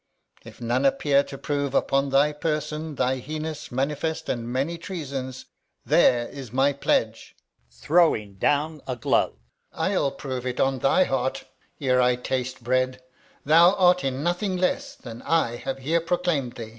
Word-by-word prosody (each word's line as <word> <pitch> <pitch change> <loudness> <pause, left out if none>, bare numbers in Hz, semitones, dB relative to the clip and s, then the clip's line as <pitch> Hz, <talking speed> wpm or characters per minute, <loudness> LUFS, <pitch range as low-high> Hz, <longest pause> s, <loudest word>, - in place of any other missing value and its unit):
If - - -13
none 120 +2 0
appear 140 +1 +3
to 135 - -8
prove 140 -1 -2
upon 140 0 +2
thy 140 +2 +3
person 150 0 -3
Thy 130 0 +1
heinous, 155 +3 -6
manifest, 145 +5 -2
and 120 -1 -3
many 140 +7 -1
treasons, 135 -8 -6 0.4
There 120 -1 +4
is 135 -5 -9
my 135 +3 +2
pledge 140 - -1 0.3
[throws 110 - +2
down 150 +4 +1
a 130 - -2
glove]! 115 - +1 0.4
I'll 140 - 0
prove 130 -2 -5
it 125 - -3
on 135 -1 +1
thy 135 +9 +4
heart, 130 -4 -1 0.4
Ere 130 -2 +2
I 125 0 +3
taste 130 0 -3
bread, 130 +1 0 0.4
thou 170 +6 +6
art 180 -1 +4
in 135 +1 -2
nothing 180 +3 -1
less 275 +10 -1
Than 115 -1 -10
I 140 -8 +1
have 135 +2 -4
here 160 +6 0
proclaim'd 165 -7 -1
thee. 115 -2 -7
135 Hz, 155 wpm, -25 LUFS, 130-155 Hz, 0.4 s, thou